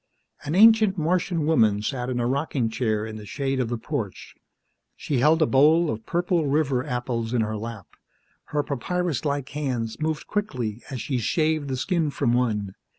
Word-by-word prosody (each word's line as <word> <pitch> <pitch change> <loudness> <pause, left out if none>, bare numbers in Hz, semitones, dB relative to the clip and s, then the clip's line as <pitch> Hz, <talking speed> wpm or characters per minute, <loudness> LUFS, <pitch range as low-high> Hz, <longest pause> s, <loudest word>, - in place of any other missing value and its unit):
An 150 - -2
ancient 215 -1 +6
Martian 170 0 0
woman 110 -9 +3
sat 125 +1 -2
in 125 -1 -1
a 120 - 0
rocking 135 -2 0
chair 110 -3 -1
in 110 -1 -7
the 105 - -9
shade 135 +1 -2
of 125 -3 0
the 120 - -2
porch. 115 - -5 0.6
She 140 -4 -2
held 155 +5 +4
a - - +4
bowl 155 +5 +4
of 110 0 -6
purple 175 -2 +1
river 140 -3 +1
apples 120 -2 -2
in 120 - +2
her 110 0 -2
lap. 110 -2 -6 0.6
Her 150 -1 -1
papyrus 155 +1 -2
like 140 -2 -1
hands 125 -7 -3
moved 155 0 -2
quickly 125 - -3
as 130 -4 -5
she 130 -4 -2
shaved 155 +4 0
the 130 -1 -2
skin 165 +2 0
from 120 -4 0
one. 105 -6 0
135 Hz, 180 wpm, -25 LUFS, 115-155 Hz, 0.6 s, ancient